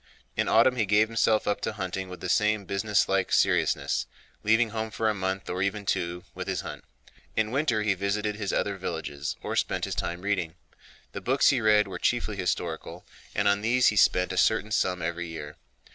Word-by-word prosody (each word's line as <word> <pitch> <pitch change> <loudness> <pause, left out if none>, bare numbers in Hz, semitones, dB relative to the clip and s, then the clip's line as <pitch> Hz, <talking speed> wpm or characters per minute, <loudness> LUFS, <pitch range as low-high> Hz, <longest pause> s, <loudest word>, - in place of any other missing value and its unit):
In - - 0
autumn 125 +3 +4
he 110 -4 +1
gave 105 +2 +4
himself 110 -1 +2
up 105 - 0
to - - -2
hunting 95 -2 -4
with 90 - -9
the 95 - -3
same 105 +1 +2
business 100 +2 +1
like 95 -1 0
seriousness—leaving 115 +1 +1
home 110 0 -3
for 110 0 -1
a 110 - +2
month, 95 -1 -3
or 90 +1 -3
even 100 +1 -1
two, 90 -1 -1
with - - -6
his - - -1
hunt. - - -8 0.5
In 110 0 +1
winter 130 -6 +1
he 105 -2 +2
visited 100 +2 -1
his 100 -3 -3
other - - -1
villages 70 0 -4
or - - -3
spent - - 0
his - - -4
time 85 +1 -3
reading. 95 -5 -1 0.6
The - - -6
books 130 +2 +3
he 130 -3 +2
read 105 -1 +4
were - - -6
chiefly 120 -3 0
historical, 90 -3 -3 0.3
and 100 +1 +2
on 100 0 +3
these 120 +3 +4
he 105 - -2
spent 90 -2 +3
a - - -4
certain 110 +3 +2
sum 90 -4 0
every 85 +1 -3
year. 75 -3 -8
105 Hz, 200 wpm, -27 LUFS, 95-110 Hz, 0.6 s, autumn